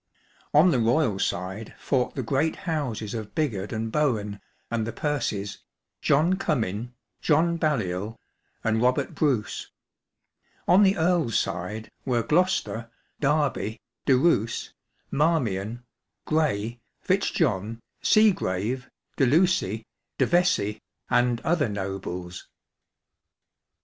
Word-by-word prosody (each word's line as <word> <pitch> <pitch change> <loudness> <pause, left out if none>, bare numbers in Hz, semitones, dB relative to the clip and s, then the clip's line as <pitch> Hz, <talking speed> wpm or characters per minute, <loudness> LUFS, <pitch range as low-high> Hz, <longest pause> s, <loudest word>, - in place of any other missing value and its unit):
On 160 +5 +6
the 130 - +2
royal 115 -2 +2
side 95 +5 -3
fought 130 -3 0
the 130 - -2
great 140 +7 +1
houses 130 - -2
of 110 -3 -6
Bigod 110 -11 -1
and 110 0 -3
Bohun 110 -9 0 0.3
and 115 -1 -1
the - - -2
Percys 115 -7 -2 0.2
— - - -59
John 165 +7 +3
Comyn, 120 - -2 0.3
John 170 +2 +3
Baliol, 110 - -1 0.5
and 110 0 +1
Robert 130 +3 +1
Bruce; 135 -9 0 1.0
on 185 +3 +6
the 195 -1 +5
EarFs 160 -7 +1
side 105 +6 -2
were 120 -3 +1
Gloucester, 155 -9 +1 0.3
Derby, 145 -7 0 0.3
De 130 - +6
Roos, 125 -7 +1 0.4
Marmlon, 120 - 0 0.4
Grey, 120 -7 0 0.2
Fitzjohn, 115 - 0 0.2
Seagrave, 125 - +2 0.3
De 135 - +4
Lucy, 145 - +2 0.3
De - - +3
Vescey, 175 - +2 0.3
and 120 -1 +3
other 155 -5 +1
nobles. 95 -3 -5
120 Hz, 110 wpm, -26 LUFS, 105-155 Hz, 1.0 s, On